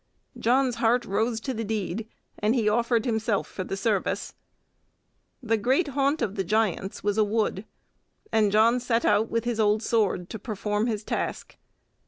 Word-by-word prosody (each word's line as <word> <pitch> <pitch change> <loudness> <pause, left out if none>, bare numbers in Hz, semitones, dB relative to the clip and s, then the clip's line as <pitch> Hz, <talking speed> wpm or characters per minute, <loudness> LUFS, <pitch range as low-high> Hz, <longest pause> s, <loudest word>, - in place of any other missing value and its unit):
John's 250 0 +2
heart 235 +1 +2
rose 220 +3 0
to 265 - -3
the 225 -1 -3
deed, 215 0 -3 0.3
and 215 +4 +2
he 225 -4 +1
offered 235 +1 +2
himself 220 -3 0
for 185 - -5
the 195 - -4
service. 200 0 -1 1.1
The 225 -1 +1
great 265 - +1
haunt 280 +1 +1
of 205 -4 -1
the 195 - -2
giants 200 -1 -1
was 205 +1 0
a - - +6
wood, 210 -1 -1 0.7
and 215 -2 +3
John 225 +4 +4
set 235 -1 0
out 210 +2 +3
with 230 0 -1
his 240 -2 -2
old 215 0 +2
sword 210 -7 +1
to 220 - -5
perform 210 +1 -2
his 215 -2 -2
task. - - -4
220 Hz, 170 wpm, -26 LUFS, 210-235 Hz, 1.1 s, a